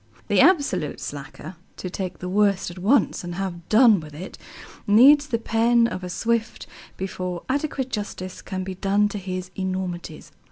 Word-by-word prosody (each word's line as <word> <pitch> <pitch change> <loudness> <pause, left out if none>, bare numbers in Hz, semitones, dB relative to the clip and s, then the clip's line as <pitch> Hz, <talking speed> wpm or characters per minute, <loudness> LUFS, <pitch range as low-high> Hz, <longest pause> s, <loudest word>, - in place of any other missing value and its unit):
The - - +4
absolute 280 - +2
slacker 145 +4 -8 0.2
(to - - -5
take 185 -1 -4
the 180 - -6
worst 195 -1 +1
at 175 - -10
once, 215 +5 +2
and 175 0 -5
have 175 -3 -5
done 220 -2 +6
with 150 -2 -11
it) 180 +5 -8 0.5
needs 280 +8 +7
the 240 -5 0
pen 230 +1 +2
of 185 -5 -3
a 180 - -5
Swift 225 +4 -1 0.3
before 185 -2 -4
adequate 270 -1 -2
justice 185 -3 -5
can 185 -1 -5
be 190 0 -5
done 200 +2 +1
to 205 - -5
his 185 -1 -5
enormities. 185 -4 -4
190 Hz, 165 wpm, -23 LUFS, 180-230 Hz, 0.5 s, needs